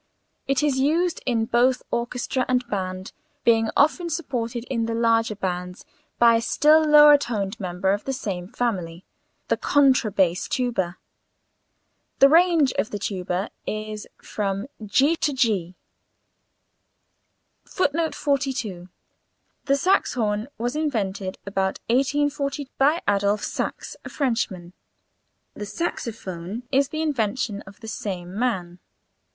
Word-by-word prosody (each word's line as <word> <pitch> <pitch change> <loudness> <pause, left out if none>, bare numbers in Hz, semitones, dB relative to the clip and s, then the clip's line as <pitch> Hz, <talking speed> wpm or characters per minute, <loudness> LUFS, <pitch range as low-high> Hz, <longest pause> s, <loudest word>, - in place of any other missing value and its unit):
It 275 0 +1
is 280 -3 +1
used 330 +6 +1
in 230 -3 +1
both 245 +3 +2
orchestra 245 +2 -1
and 250 -1 0
band, 185 -3 -4 0.3
being 225 -1 +3
often 335 +4 +3
supported 245 -8 -3
in 235 -3 -2
the 230 - -2
larger 230 -1 +2
bands 180 -2 -4 0.3
by 235 -1 +6
a - - -1
still 305 +6 +4
lower 295 -1 +8
toned 215 -4 -3
member 185 0 -1
of 205 - -4
the 270 - -1
same 190 -9 -4
family 185 -7 -3 0.4
the - - +1
contra 270 -6 +3
bass 185 -2 +1
tuba. 190 -8 -1 1.2
The 275 - +7
range 330 -3 +5
of - - 0
the 205 - -4
tuba 185 -1 -3 0.2
is 215 0 -5 0.2
from 195 -1 -3
[Illustration: 215 - -8
GG] 205 - -2 0.2
to 295 - +1
[Illustration: - - -6
g']. 195 -8 +1 1.9
[Footnote 320 -2 0
42: 255 -10 -2 0.8
The 275 - +3
saxhorn 240 - +1
was 240 +4 -2
invented 200 -11 -2
about 195 -1 -1
1840 280 +1 0
by 295 +5 +3
Adolphe 205 +1 +1
Sax, - - -4
a - - -7
Frenchman. 215 - -2 0.8
The 205 - -7
saxophone 210 - -5
is 275 0 +2
the 310 +1 -2
invention 225 -7 -1
of 200 +1 -14
the 225 - -9
same 185 -5 -5
man. 190 -7 -2
230 Hz, 130 wpm, -24 LUFS, 195-275 Hz, 1.9 s, lower